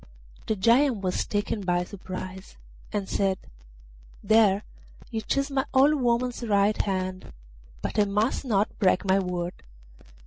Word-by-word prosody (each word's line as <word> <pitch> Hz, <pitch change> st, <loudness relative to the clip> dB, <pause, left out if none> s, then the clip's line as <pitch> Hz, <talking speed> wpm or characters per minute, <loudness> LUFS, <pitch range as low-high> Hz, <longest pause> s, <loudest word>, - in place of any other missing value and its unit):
The 220 Hz, -, +1 dB
Giant 235 Hz, +3 st, +3 dB
was 185 Hz, -2 st, -1 dB
taken 205 Hz, +1 st, -1 dB
by 175 Hz, -2 st, +1 dB
surprise, 185 Hz, -, -8 dB, 0.3 s
and 200 Hz, -2 st, -2 dB
said: 195 Hz, -1 st, 0 dB, 0.9 s
'There, 215 Hz, -2 st, +4 dB, 0.5 s
you 225 Hz, -1 st, -2 dB
chose 275 Hz, +4 st, -1 dB
my 270 Hz, -1 st, 0 dB
old 275 Hz, +3 st, +6 dB
woman's 245 Hz, +1 st, 0 dB
right 210 Hz, -2 st, +2 dB
hand; 185 Hz, -1 st, -3 dB, 0.5 s
but -, -, -2 dB
I 210 Hz, -, +5 dB
must 210 Hz, +5 st, 0 dB
not 210 Hz, -5 st, 0 dB
break 185 Hz, 0 st, +3 dB
my 190 Hz, 0 st, +3 dB
word. 180 Hz, -2 st, -3 dB
205 Hz, 135 wpm, -26 LUFS, 190-230 Hz, 0.9 s, old